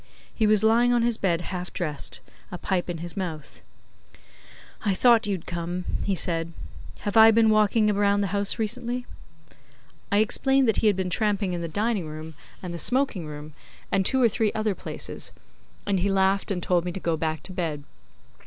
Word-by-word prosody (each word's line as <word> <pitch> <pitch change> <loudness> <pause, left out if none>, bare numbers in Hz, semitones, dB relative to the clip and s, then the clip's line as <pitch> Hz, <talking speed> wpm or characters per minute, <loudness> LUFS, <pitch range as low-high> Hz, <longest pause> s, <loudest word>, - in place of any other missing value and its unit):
He 220 - +1
was 215 0 +4
lying 235 +2 +4
on 240 -1 +2
his 235 -1 0
bed 175 -3 +1
half 180 0 -6
dressed, 150 -5 -4 0.3
a 180 - -5
pipe 180 0 -2
in 175 - -3
his 170 - -5
mouth. 165 -6 -6 1.2
'I 200 -2 +1
thought 230 0 +4
you'd 190 -5 -3
come,' 175 +1 -4 0.2
he 195 - 0
said. 165 -1 0 0.5
'Have 205 - -3
I 220 0 +9
been 225 0 +4
walking 215 +1 +3
round 205 0 +2
the 195 - -2
house 200 -1 0
recently?' 240 +2 -2 1.1
I 200 - +3
explained 265 +5 +3
that 225 - +2
he 220 - +2
had 205 - +4
been 185 -1 -3
tramping 205 -1 0
in 175 - -3
the 170 - -3
dining 205 0 -1
room 155 +1 -8 0.3
and 180 -1 -5
the 170 - -4
smoking 250 - +2
room 150 0 -9 0.4
and 195 - +2
two 265 +7 +2
or 245 - +5
three 220 -1 0
other 215 -1 0
places, - - -6 0.5
and 195 -2 0
he 195 +3 0
laughed 195 0 +1
and 180 -4 -2
told 175 -2 +1
me 180 - -3
to 190 - -5
go 170 -2 -1
back 160 0 -3
to 190 - -5
bed. 160 -5 -3
195 Hz, 190 wpm, -25 LUFS, 175-220 Hz, 1.2 s, I